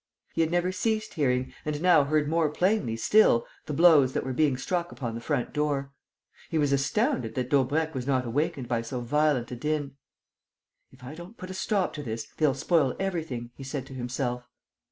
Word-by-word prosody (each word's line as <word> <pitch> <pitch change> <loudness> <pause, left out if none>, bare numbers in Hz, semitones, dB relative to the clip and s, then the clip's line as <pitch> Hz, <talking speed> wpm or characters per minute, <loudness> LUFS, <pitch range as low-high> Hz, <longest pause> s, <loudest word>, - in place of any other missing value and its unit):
He - - +1
had 160 - +2
never 175 +2 +1
ceased 215 +2 -1
hearing 130 -4 0
and 150 -1 -2
now 170 -4 +5
heard 150 0 +1
more 160 0 +2
plainly 175 - +1
still 120 - +4 0.2
the 150 - -3
blows 150 -5 +6
that - - -1
were 130 - -3
being 140 -1 +2
struck 175 +5 -2
upon 120 -4 -5
the 115 - -5
front 135 0 -2
door. 145 -2 -1 0.6
He 165 - -1
was 145 -2 +2
astounded 210 - 0
that 125 -1 -2
Daubrecq 150 +4 +2
was 130 -1 -4
not 130 -2 +1
awakened 130 +1 -1
by 115 -1 0
so 120 +2 -5
violent 145 0 +1
a - - -3
din: 145 +1 -2 0.9
"If 130 0 -18
I 130 +4 -7
don't 175 +8 -11
put 185 0 -7
a - - -5
stop 190 0 0
to 150 - -5
this, 115 -4 -4
they'll 150 -4 +3
spoil 140 -1 +2
everything," 160 -11 -3
he 135 - -10
said 135 0 -4
to 135 - -11
himself. 125 -1 -3
145 Hz, 195 wpm, -27 LUFS, 125-165 Hz, 0.9 s, blows